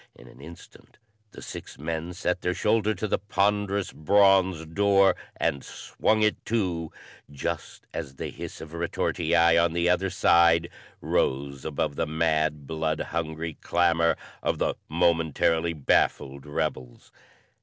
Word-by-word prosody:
In - - -16
an 65 - -16
instant 85 +4 -14 0.3
the - - -12
six - - -9
men 80 +3 -4
set 90 0 -1
their 90 0 -1
shoulder 110 0 +1
to 110 - -3
the - - 0
ponderous 100 0 0
bronze 95 0 +3
door 100 +3 +3 0.2
and 70 -1 -1
swung 110 0 -1
it 105 - +1
to, 90 -8 -1 0.4
just 70 -1 -5
as 65 - -6
the - - -5
hiss - - -8
of 80 0 -10
a - - -6
retortii 85 - -1 0.3
on 85 -1 +1
the 85 0 +1
other 90 +2 +2
side 85 -2 +4 0.3
rose 70 0 -1
above 70 -1 -2
the 80 - 0
mad, 80 -2 0
blood 80 +1 -2
hungry 80 0 -4
clamor 85 -1 +2 0.2
of - - -1
the - - 0 0.2
momentarily 85 0 +1
baffled 70 -1 0
rebels. 65 -4 -4
85 Hz, 140 wpm, -26 LUFS, 80-95 Hz, 0.4 s, side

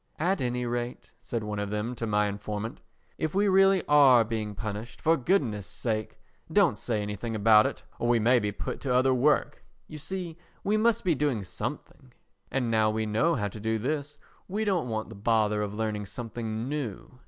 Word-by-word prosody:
"At 180 +3 0
any 125 -1 -1
rate," 120 0 -4
said 115 -2 -4
one 105 -1 -3
of 105 -1 -2
them 105 +4 -2
to 115 -2 -4
my 105 -1 +2
informant, 105 +2 -4 0.4
"if 155 +2 -2
we 205 +1 +3
really 195 -1 +4
are 135 -5 +6
being 110 -2 -4
punished, 110 +4 -6
for 165 +1 +3
goodness' 125 - 0
sake 110 +4 -3 0.3
don't - - +4
say 110 -4 -2
anything 105 +3 -4
about 110 0 +6
it - - -7 0.2
or 120 - 0
we 120 0 +4
may 120 +3 +4
be 105 -2 -1
put - - -5
to 130 -3 0
other 130 +1 +4
work. 145 +3 +1 0.2
You 155 - -8
see, 175 0 -5 0.2
we 205 +2 +1
must 220 +1 +2
be 180 - +3
doing 140 -7 0
something, 130 +7 -6 0.4
and 125 -4 -1
now 110 -1 +3
we 110 0 -1
know 110 +11 +2
how 105 -5 -1
to 105 - -9
do 110 +1 0
this, 145 +5 -3 0.3
we 210 +4 -2
don't 180 - 0
want 110 -1 -3
the 110 - -9
bother 105 0 +1
of 105 0 -3
learning 105 -2 -2
something 115 +1 -5
new. 125 -4 -5
120 Hz, 195 wpm, -28 LUFS, 105-145 Hz, 0.4 s, are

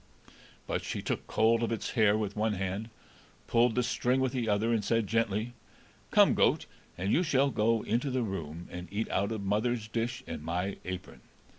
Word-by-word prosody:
But - - -2
she - - -4
took - - -3
hold 115 +1 +3
of 115 - 0
its 115 - -2
hair 110 -3 +4
with 105 -2 -3
one 110 0 +1
hand, 95 +3 -3 0.6
pulled 120 0 +3
the 125 - +2
string 125 +1 +1
with 130 -1 +1
the 120 -4 -1
other, 105 +3 +2
and 110 -2 +1
said 115 +2 +1
gently, 115 +1 0 0.6
"Come, - - +6
goat, - - +3 0.3
and 95 +3 0
you - - +4
shall 140 -5 +2
go 115 0 +2
into 120 +5 0
the 130 -1 0
room 85 -5 -5
and 90 0 -6
eat 105 +2 -2
out 100 +3 0
of 110 -3 -3
mother's 110 +3 0
dish 115 +1 -2
and - - -6
my 90 +5 -2
apron." 90 +1 -6
110 Hz, 190 wpm, -30 LUFS, 100-120 Hz, 0.6 s, Come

